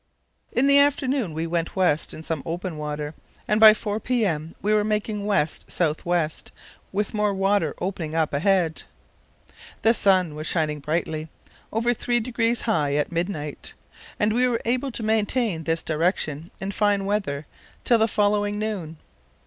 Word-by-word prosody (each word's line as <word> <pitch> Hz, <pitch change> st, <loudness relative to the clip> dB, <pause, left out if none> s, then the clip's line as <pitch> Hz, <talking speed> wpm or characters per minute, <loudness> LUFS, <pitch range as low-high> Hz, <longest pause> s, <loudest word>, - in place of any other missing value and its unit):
In 250 Hz, -, +2 dB
the 280 Hz, 0 st, +6 dB
afternoon 275 Hz, -, +2 dB
we 160 Hz, +2 st, -3 dB
went 165 Hz, 0 st, -2 dB
west 175 Hz, -5 st, +1 dB
in 160 Hz, -, -8 dB
some 160 Hz, -3 st, -3 dB
open 175 Hz, +1 st, -4 dB
water, 150 Hz, 0 st, -4 dB, 0.3 s
and 210 Hz, 0 st, +2 dB
by 215 Hz, -1 st, +9 dB
4 210 Hz, -1 st, -3 dB
p.m. 195 Hz, -11 st, -1 dB
we 210 Hz, +1 st, +1 dB
were 210 Hz, -1 st, +3 dB
making 210 Hz, -1 st, -1 dB
west 165 Hz, -7 st, 0 dB
south 160 Hz, -1 st, -1 dB
west 170 Hz, -3 st, -1 dB, 0.4 s
with 205 Hz, +1 st, -2 dB
more 210 Hz, -2 st, +1 dB
water 195 Hz, +1 st, +1 dB
opening 175 Hz, -4 st, -3 dB
up 160 Hz, -2 st, +1 dB
ahead. 170 Hz, +1 st, +2 dB, 1.0 s
The 225 Hz, -, +5 dB
sun 185 Hz, -7 st, +3 dB
was 155 Hz, +1 st, -5 dB
shining 155 Hz, -3 st, 0 dB
brightly, 155 Hz, +1 st, -2 dB, 0.4 s
over 230 Hz, +2 st, +1 dB
three 240 Hz, +1 st, 0 dB
degrees 235 Hz, 0 st, 0 dB
high 150 Hz, -11 st, +1 dB
at 150 Hz, +3 st, 0 dB
midnight, 165 Hz, -4 st, -4 dB, 0.4 s
and 210 Hz, +1 st, +2 dB
we 250 Hz, +2 st, +3 dB
were 235 Hz, -2 st, 0 dB
able 255 Hz, +4 st, 0 dB
to 235 Hz, -2 st, -5 dB
maintain 215 Hz, -5 st, 0 dB
this 165 Hz, 0 st, 0 dB
direction 160 Hz, -1 st, -1 dB
in 195 Hz, +1 st, -3 dB
fine 205 Hz, -1 st, +1 dB
weather 195 Hz, -8 st, -1 dB, 0.4 s
till 235 Hz, -2 st, +4 dB
the 220 Hz, -, +4 dB
following 205 Hz, -1 st, +1 dB
noon. 200 Hz, -7 st, -4 dB
195 Hz, 160 wpm, -24 LUFS, 160-220 Hz, 1.0 s, by